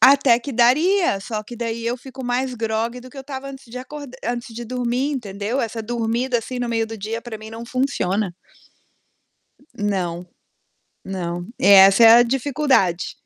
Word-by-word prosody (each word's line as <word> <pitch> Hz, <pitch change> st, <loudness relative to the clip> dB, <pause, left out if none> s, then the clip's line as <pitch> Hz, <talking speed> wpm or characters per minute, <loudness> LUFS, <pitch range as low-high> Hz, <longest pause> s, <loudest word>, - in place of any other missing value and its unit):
Até 270 Hz, -3 st, +6 dB
que 280 Hz, -, -6 dB
daria, 270 Hz, -, +3 dB
só 215 Hz, 0 st, -4 dB
que 240 Hz, -, -9 dB
daí, 230 Hz, 0 st, -4 dB
eu 240 Hz, +2 st, -1 dB
fico 260 Hz, +1 st, -10 dB
mais 250 Hz, +1 st, -1 dB
grogue 225 Hz, +1 st, -2 dB
do 255 Hz, -, -12 dB
que 280 Hz, -, -17 dB
eu 270 Hz, -, -6 dB
tava 275 Hz, -1 st, -6 dB
antes 270 Hz, -2 st, -11 dB
de 250 Hz, -, -6 dB
acor 285 Hz, +3 st, -8 dB, 0.2 s
antes 240 Hz, -1 st, -4 dB
de 240 Hz, +1 st, -6 dB
dormir, 250 Hz, +4 st, -1 dB
entendeu? 215 Hz, +1 st, -3 dB
Essa 225 Hz, 0 st, -3 dB
dormida, 235 Hz, +2 st, -1 dB
assim, 250 Hz, +2 st, -6 dB
no 245 Hz, -, -2 dB
meio 225 Hz, -1 st, 0 dB
do 225 Hz, -1 st, -8 dB
dia, 225 Hz, +3 st, -4 dB
pra 225 Hz, -3 st, -7 dB
mim 220 Hz, 0 st, -10 dB
não 225 Hz, +1 st, -8 dB
funciona. 215 Hz, -7 st, -1 dB, 1.4 s
Não, 180 Hz, -5 st, -2 dB, 0.8 s
não, 175 Hz, -2 st, -4 dB
essa 195 Hz, +2 st, +7 dB
é 225 Hz, -, +10 dB
a -, -, +6 dB
dificuldade. 260 Hz, -, +1 dB
235 Hz, 170 wpm, -21 LUFS, 215-255 Hz, 1.4 s, é